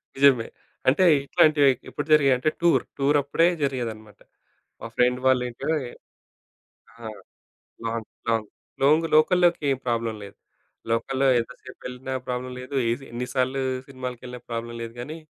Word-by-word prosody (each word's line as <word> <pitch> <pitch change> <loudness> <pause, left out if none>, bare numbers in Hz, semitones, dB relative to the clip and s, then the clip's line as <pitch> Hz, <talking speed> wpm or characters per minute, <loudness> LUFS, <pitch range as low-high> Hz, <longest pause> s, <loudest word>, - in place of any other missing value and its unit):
నిజమే. 135 -4 +4 0.4
అంటే 145 +8 +5 0.2
ఇట్లాంటివి 145 -1 +4 0.2
ఎప్పుడు 145 - -5
జరిగాయంటే 135 -2 +4
టూర్, 170 0 +4 0.2
టూరప్పుడే 145 +3 +3 0.2
జరిగేదనమాట. 115 -6 -4 0.6
మా - - -5
ఫ్రెండ్ 125 +1 +3
వాళ్ళ 130 -1 +4
ఇంట్లో 125 +6 -3 1.3
ఆ! 115 - -10 0.8
లాంగ్ 115 -1 -3 0.2
లాంగ్ 110 -2 0 0.3
లోంగ్ 155 +4 +4
లోకల్‌లోకేం 155 -4 +3
ప్రాబ్లమ్ 115 -2 -1
లేదు. 100 - -12 0.5
లోకల్‌లో 130 +4 +1
ఎంతసేపెళ్ళినా 125 +1 -8
ప్రాబ్లమ్ 125 0 -4
లేదు, 130 +2 -6
ఏసి 125 +4 -3
ఎన్ని 120 +1 -3
సార్లు 130 +1 0 0.3
సినిమాలకెళ్ళినా 125 -2 -7
ప్రాబ్లమ్ 115 0 -4
లేదు 115 0 -6
గానీ, 150 +6 -6
130 Hz, 120 wpm, -25 LUFS, 120-140 Hz, 1.3 s, అంటే